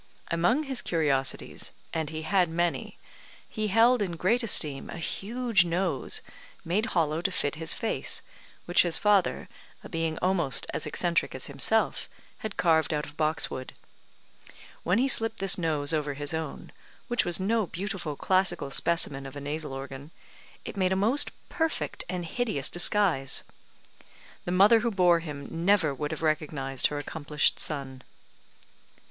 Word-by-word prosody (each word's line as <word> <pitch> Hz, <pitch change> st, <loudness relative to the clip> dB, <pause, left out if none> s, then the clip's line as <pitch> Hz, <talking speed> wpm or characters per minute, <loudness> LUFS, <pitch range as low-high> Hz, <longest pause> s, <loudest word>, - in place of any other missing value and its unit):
Among 175 Hz, -, +2 dB
his 270 Hz, -4 st, 0 dB
curiosities, 140 Hz, -5 st, -1 dB, 0.2 s
and 160 Hz, -2 st, -2 dB
he 160 Hz, 0 st, -5 dB
had 180 Hz, +1 st, +2 dB
many, 170 Hz, +1 st, -2 dB, 0.5 s
he 215 Hz, -2 st, -3 dB
held 225 Hz, +4 st, +4 dB
in 185 Hz, -4 st, -1 dB
great 220 Hz, +9 st, +2 dB
esteem 150 Hz, -, +2 dB
a -, -, -6 dB
huge 220 Hz, +4 st, +1 dB
nose, 175 Hz, -3 st, -1 dB, 0.4 s
made 195 Hz, +7 st, 0 dB
hollow 160 Hz, 0 st, +1 dB
to 190 Hz, -, 0 dB
fit 145 Hz, -5 st, -1 dB
his 160 Hz, +1 st, 0 dB
face, 225 Hz, -, -2 dB, 0.4 s
which 175 Hz, -, +5 dB
his 175 Hz, -2 st, +1 dB
father, 205 Hz, -3 st, +2 dB, 0.4 s
a -, -, -10 dB
being 165 Hz, -2 st, -2 dB
almost 175 Hz, -7 st, +1 dB
as -, -, -2 dB
eccentric 170 Hz, +2 st, 0 dB
as -, -, -3 dB
himself, -, -, 0 dB, 0.3 s
had 215 Hz, -2 st, -6 dB
carved 160 Hz, -2 st, +2 dB
out 150 Hz, -, -2 dB
of 150 Hz, -, -12 dB
boxwood. 155 Hz, -4 st, -1 dB, 1.1 s
When 180 Hz, +4 st, +1 dB
he 260 Hz, +3 st, +3 dB
slipped 225 Hz, -4 st, +2 dB
this 195 Hz, 0 st, +5 dB
nose 155 Hz, -3 st, -1 dB
over 150 Hz, -2 st, -1 dB
his 145 Hz, +2 st, -5 dB
own 160 Hz, 0 st, -5 dB, 0.4 s
(which 240 Hz, -1 st, +1 dB
was 175 Hz, 0 st, 0 dB
no 215 Hz, +1 st, +1 dB
beautiful 180 Hz, -5 st, -4 dB
classical 180 Hz, -5 st, +1 dB
specimen 140 Hz, -4 st, +1 dB
of 135 Hz, -, -11 dB
a -, -, -5 dB
nasal 150 Hz, +1 st, -4 dB
organ), 135 Hz, +1 st, -7 dB, 0.6 s
it -, -, -6 dB
made 185 Hz, -2 st, +1 dB
a -, -, +2 dB
most 225 Hz, +9 st, +3 dB, 0.2 s
perfect 325 Hz, -2 st, -2 dB
and 180 Hz, -2 st, -3 dB
hideous 165 Hz, -, -1 dB
disguise. 175 Hz, -6 st, +3 dB, 1.0 s
The 175 Hz, -, -2 dB
mother 205 Hz, +5 st, +6 dB
who 235 Hz, +2 st, 0 dB
bore 180 Hz, -5 st, +4 dB
him 145 Hz, -4 st, -7 dB, 0.2 s
never 180 Hz, -6 st, +3 dB
would 150 Hz, +2 st, -4 dB
have 160 Hz, 0 st, -5 dB
recognised 150 Hz, -4 st, 0 dB
her 150 Hz, -, -5 dB
accomplished 150 Hz, 0 st, 0 dB
son. 135 Hz, -4 st, -3 dB
170 Hz, 155 wpm, -28 LUFS, 150-195 Hz, 1.1 s, mother